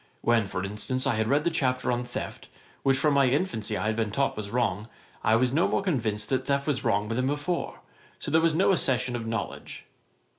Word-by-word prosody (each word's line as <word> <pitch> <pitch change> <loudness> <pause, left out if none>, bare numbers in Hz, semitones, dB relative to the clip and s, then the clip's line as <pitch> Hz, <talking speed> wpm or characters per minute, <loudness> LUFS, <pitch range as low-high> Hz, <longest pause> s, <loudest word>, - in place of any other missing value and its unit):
When, 115 -3 +2
for 90 -1 -4
instance, 105 +6 -2
I - - +2
had 110 0 0
read 140 +4 +2
the 170 - +1
chapter 130 -5 0
on 120 0 -1
theft, 120 - -6 0.3
which 135 -1 +3
from 150 +1 +2
my 140 -1 +4
infancy 125 - -1
I - - -2
had 110 0 +1
been 110 -1 0
taught 140 +6 0
was 105 -1 -5
wrong, 110 -3 -1 0.4
I 110 - +4
was 125 +2 +2
no 165 +4 +3
more - - 0
convinced 110 - -1
that 130 - -1
theft 140 0 +1
was 140 -4 0
wrong 105 -4 +1
than 125 +3 0
before; 145 +5 -2 0.4
so - - -5
there 160 +1 +4
was 165 -1 +2
no 190 +4 +4
accession 125 -8 +1
of 115 -2 -4
knowledge. 115 -1 -5
125 Hz, 220 wpm, -27 LUFS, 110-140 Hz, 0.4 s, my